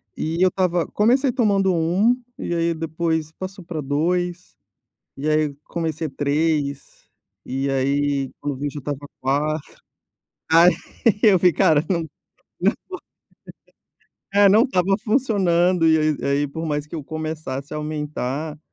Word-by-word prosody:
E 165 +3 -2
eu 185 - +5
estava 180 -3 0
comecei 250 +5 +2
tomando 200 -6 +2
1 180 +9 +2 0.2
e - - -3
aí 170 0 +1
depois 160 -1 -2
passou 185 +2 -8
para 160 -3 -4
2, 175 +5 -1 0.6
e 145 +3 -2
aí 155 -1 +1
comecei 160 -2 -3
3, 145 0 -2 0.4
e 135 +2 -2
aí, 140 0 0
quando 145 -1 -3
eu 130 - -11
vi, 145 - -2
já 145 - -7
estava 145 0 -5
4. 145 +3 -1 0.8
Aí, 170 +2 +7 0.5
eu 205 -5 +6
vi 180 -1 +4
cara 160 -2 +3
não 175 -3 +1 2.3
não, 205 - +4
é 200 - +8
não 215 +4 +6
estava 195 - +1
funcionando, 185 -8 +2
e 160 0 +5
aí 155 -1 +1
e - - -5
aí 140 +1 +1
por 160 +4 -6
mais 150 -2 -2
que - - -17
eu 155 - -5
começasse 155 -3 -5
a - - -3
aumentar 150 -1 -4
160 Hz, 145 wpm, -22 LUFS, 145-180 Hz, 2.3 s, é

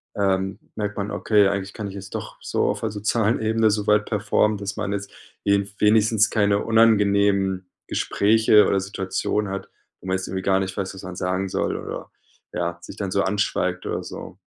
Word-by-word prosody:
ähm, 95 -1 0 0.2
merkt 105 -1 -3
man: 100 +1 -3
„Okay, 105 -1 +3
eigentlich 100 0 -3
kann 105 -2 -5
ich 95 - -8
es 95 -1 -8
doch, - - -6
so - - 0
auf - - -3
'ner 110 - -1
sozialen 110 +2 0
Ebene 110 0 +2
so 105 0 -2
weit 105 0 +4
performen, 105 0 +1
dass 100 0 -5
man 100 -2 -2
jetzt 100 0 -4 0.3
wen 100 0 +2
wenigstens 110 +1 +4
keine 100 -2 +2
unangenehmen 100 -4 +3 0.2
Gespräche 110 0 +4
oder 100 - +2
Situationen 100 +1 -2
hat, 100 - -5 0.3
wo 95 - -10
man 95 0 +1
jetzt 95 - -5
irgendwie 95 0 -3
gar 95 -1 +3
nicht 95 -1 -3
weiß, 100 -1 -3
was 95 - -10
man 95 0 -7
sagen 95 +1 -1
soll, - - -1
oder, - - -7 0.4
ja, 85 0 -2
sich 95 - -10
dann 100 -2 -3
so 100 - +2
anschweigt 100 +2 -1
oder - - -3
so.“ - - -9
100 Hz, 195 wpm, -23 LUFS, 95-105 Hz, 0.4 s, weit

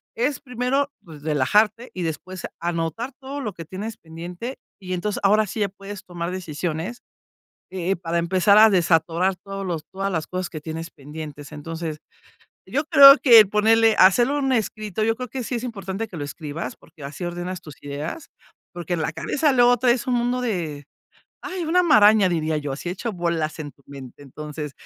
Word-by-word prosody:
es 255 +4 0
primero, 265 +2 -1
pues, 155 -4 -13
relajarte 210 - +2
y 180 - -3
después 175 +3 -5
anotar 170 - -2
todo 275 +2 -6
lo 215 -5 -3
que 165 -2 -9
tienes 205 +6 -6
pendiente. 175 +9 -8 0.2
Y 185 -1 -5
entonces, 195 +4 -2
ahora 210 +1 +4
sí, 215 - -4
ya 200 - +1
puedes 200 0 -10
tomar 175 -1 -5
decisiones, 175 +4 -4 0.7
eh, 190 +1 -1
para 170 0 -2
empezar 185 +4 +4
a 220 0 +8
desatorar 170 +1 +2
todos 195 0 -7
los 165 -3 -3
todas 195 +1 -2
las 160 -2 -2
cosas 185 -1 -4
que 155 - -7
tienes 160 +1 -6
pendientes. 150 0 -9
Entonces, 160 +1 -5 0.7
yo 290 +3 0
creo 275 -1 +10
que 230 -5 +8
ponerle 220 +2 +4
hacerlo 240 +10 +5
en 275 - -1
un 265 - +2
escrito, 215 -2 -2
yo 225 +1 +2
creo 250 -1 -6
que 255 0 -4
sí 245 - -3
es 235 - -3
importante 205 -2 -4
que 175 - -8
lo 145 - -4
escribas 155 - -6
porque 150 -5 -16
así 145 +6 -7
ordenas 175 +1 -5
tus 150 -3 -11
ideas, 145 - -6 0.4
porque 175 0 -4
en 165 - -1
la 160 - -1
cabeza, 280 - 0
luego 245 0 +5
traes 245 +2 +2
un 250 - +1
mundo 245 +1 0
de, 165 - -3 0.6
ay, 370 -1 -4
una 360 +3 +3
maraña 215 - +6
diría 160 -2 0
yo, 145 -2 -4
así 175 +6 -5
hecho 210 +5 -4
bolas 170 -3 -2
en 145 -2 -6
tu 140 - -29
mente. 140 0 -11
Entonces, 150 +1 -7
185 Hz, 185 wpm, -23 LUFS, 160-225 Hz, 0.7 s, creo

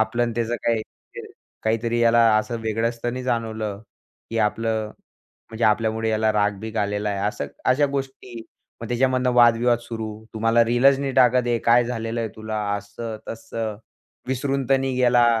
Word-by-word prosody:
आपलं 120 +2 +1
आणि 120 -1 0
त्याचं 120 0 -1
काय 115 - +3
म्हणजे 110 -1 -9 0.4
काहीतरी 115 +1 0
याला 115 0 +4 0.2
असं 115 +2 -1
वेगळं 110 +1 0
असताना 120 +2 -4
जाणवलं, 110 -4 -2 0.5
की 115 - -2
आपलं 110 0 0 0.6
म्हणजे 115 +1 -2
आपल्यामुळे 110 +1 +1
याला 110 0 +1
राग 105 -1 +1
बिग 110 +1 -7
आलेला 105 0 -1
आहे. 100 -1 -3
असं 70 - -4 0.2
अशा 145 +3 +3
गोष्टी, 135 -3 -5 0.4
मग 115 - -5
त्याच्यामधनं 130 +1 +1
वादविवाद 120 0 +4
सुरू. 110 -2 -6
तू - - -4
मला 115 +1 +4
रिलंच 125 +4 +4
नी 135 -1 -2
टाकत 125 -1 +4
आहे. 120 -1 +1
काय 120 +1 +4
झालेलंय 115 -1 -3
तुला, 110 0 -4 0.2
असं-तसं. 110 +1 -6 0.5
विसरून 135 0 -1
तर 135 - +6
नाही 135 -1 -1
गेला. 120 -1 +4
115 Hz, 160 wpm, -23 LUFS, 110-120 Hz, 0.6 s, तर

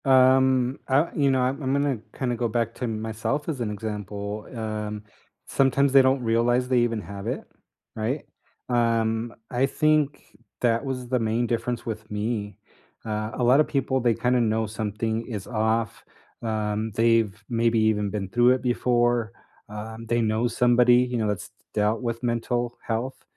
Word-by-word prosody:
Um, 130 -1 +4
uh, 140 +5 +3
you 140 -2 +3
know, 130 -1 +2
I'm 130 +4 0
I'm 130 -1 0
gonna, 140 -4 +1 0.2
kinda, 125 -2 -1
go 120 0 0
back 115 0 -1
to 125 - -3
myself 110 +6 -3
as 145 -6 -3
an 115 - -1
example, 105 0 -5
um, 105 -1 -4 0.4
sometimes 135 0 +2
they 135 - +9
don't 130 0 +2
realize 120 +2 +2
they 125 -1 +3
even 115 -2 0
have 100 +2 -8
it, - - -2 0.5
right? 120 +7 -2 0.4
Um, 115 -1 +1 0.2
I 125 +1 +2
think 155 0 +1 0.4
that 115 0 +2
was 130 -2 -4
the 125 0 +1
main 115 +1 0
difference 120 0 -2
with 110 -1 -5
me. 105 -1 -3 0.5
Uh, 110 0 -3
a 125 - -1
lotta 130 +5 +6
people, 130 -2 0
they 120 -2 +2
kinda 125 +2 +2
know 110 0 +1
something 110 +1 -2
is 105 -6 -5
off, 110 -1 -1 0.4
um, 110 -1 -2
they've 115 -3 +2
maybe 115 -1 +2
even 105 -2 +2
been 100 -1 -3
through 120 +3 +4
it 130 -1 +1
before, 120 -2 +1 0.4
um, 110 +2 -7
they 120 +1 +1
know 110 +2 +1
somebody, 120 0 +4
you 125 0 +2
know, 110 -2 0
that's 105 -3 -3
d - - -40 0.3
dealt 105 +3 +1
with 115 -1 -3
mental 120 0 -1
health, 120 +4 -3
115 Hz, 165 wpm, -25 LUFS, 110-125 Hz, 0.5 s, they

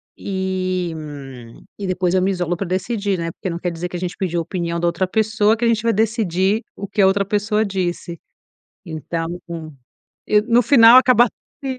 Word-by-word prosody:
e, 185 -2 -2
hum, 135 -6 -10 0.2
e 200 - -3
depois 185 -1 0
eu 185 - +3
me 190 - +1
isolo 175 -2 -1
pra 190 +2 -4
decidir, 195 +2 -1
né? 165 -1 -3
Porque 185 - -6
não 170 - -3
quer 175 0 -3
dizer 170 +1 -5
que 180 - -5
a - - -5
gente 180 0 -4
pediu 175 -3 -2
a - - -1
opinião 170 0 -3
da 175 - -1
outra 170 +2 0
pessoa, 220 +1 +2
que 235 - -1
a - - +3
gente 230 -2 +2
vai 230 +1 +2
decidir 215 -2 +1
o 200 - -6
que 200 +1 0
a 190 - +6
outra 200 +1 +2
pessoa 210 +2 0
disse. 180 -3 -3 0.7
Então 165 0 -4 0.2
com 165 -2 -7 0.6
e 210 0 +4
no 240 +2 +3
final 235 -1 +8
acaba 250 -2 +5 0.4
sim, 265 -1 -3
190 Hz, 210 wpm, -20 LUFS, 170-215 Hz, 0.7 s, final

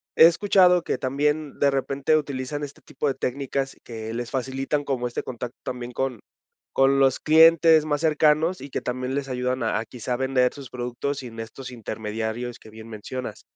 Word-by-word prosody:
he - - +9
escuchado 180 0 +5
que - - -1
también 150 +2 -1
de 140 - +4
repente 140 +2 +1
utilizan 145 0 -3
este 145 -1 -8
tipo - - -4
de - - 0
técnicas 135 +1 -2
que 110 -1 -6
les 120 0 -4
facilitan 135 +2 -1
como 130 -3 -1
este 120 - -3
contacto 125 0 -6
también 125 -1 -5
con 125 -1 -2 0.5
con 135 +1 +4
los 135 -1 +3
clientes 160 0 +6
más 145 -1 -1
cercanos, 155 +2 +3
y 140 - -8
que - - -3
también 130 +1 -3
les 140 -1 -3
ayudan 125 0 -1
a 110 -1 0
a, 110 - -4
quizá, 125 +1 -4
vender 130 0 +1
sus 140 -3 -10
productos 125 +3 -3
sin 120 -3 -9
estos 120 +4 -8
intermediarios 110 +1 -4
que - - -15
bien 110 +1 -11
mencionas. 115 +4 -6
130 Hz, 180 wpm, -24 LUFS, 120-145 Hz, 0.5 s, he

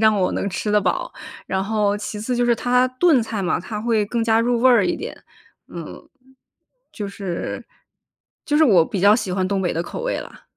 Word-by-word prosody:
让 220 -1 +4
我 185 -2 +1
能 200 - -2
吃 205 +2 -3
得 210 - +4
饱， 190 - -2 0.3
然 190 +1 -1
后 205 -1 0
其 210 0 -6
次 245 +3 -2
就 245 - +2
是 235 - +4
它 250 +2 +2
炖 325 -8 +5
菜 220 -3 -3
嘛， 180 - 0
它 210 +4 -6
会 225 -3 +1
更 235 +2 -1
加 225 0 +3
入 240 0 +1
味 255 +1 +6
儿 225 -6 +4
一 - - 0
点。 465 - -7 0.5
嗯， - - -9 0.8
就 205 -2 -5
是 195 -3 -5 0.8
就 295 - 0
是 315 - +5
我 190 - +5
比 195 - -3
较 200 +2 +6
喜 210 -6 -3
欢 185 0 0
东 200 -1 0
北 180 - 0
的 165 - -1
口 485 - -7
味 - - -2
啦。 - - -12
210 Hz, 235 characters per minute, -21 LUFS, 195-240 Hz, 0.8 s, 味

